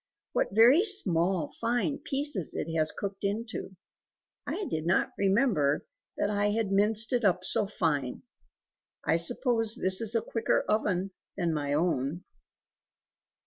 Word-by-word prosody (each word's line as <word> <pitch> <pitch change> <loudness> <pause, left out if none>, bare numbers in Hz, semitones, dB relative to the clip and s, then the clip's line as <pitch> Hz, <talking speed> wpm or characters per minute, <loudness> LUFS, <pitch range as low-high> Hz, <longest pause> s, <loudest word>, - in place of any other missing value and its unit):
What - - +1
very 240 - +6
small 180 - +2
fine 245 +5 0
pieces 280 - -2
it 165 +1 -4
has 155 -1 +1
cooked 195 0 -6
into! 205 -1 -4 0.7
I 415 - -3
did 160 - -4
not 175 - +1
remember 195 - +1 0.3
that - - 0
I 205 0 +1
had 210 -1 -1
minced 210 +3 +2
it 245 -1 +1
up 185 -2 +1
so 200 - +1
fine; 145 -10 -2 0.8
I 160 +2 +2
suppose 225 +4 +2
this 185 +2 +2
is 225 0 -2
a 230 - +2
quicker 225 -1 0
oven 195 -3 0 0.3
than 170 -3 0
my 145 -2 -2
own." 155 +1 -1
200 Hz, 140 wpm, -28 LUFS, 170-230 Hz, 0.8 s, very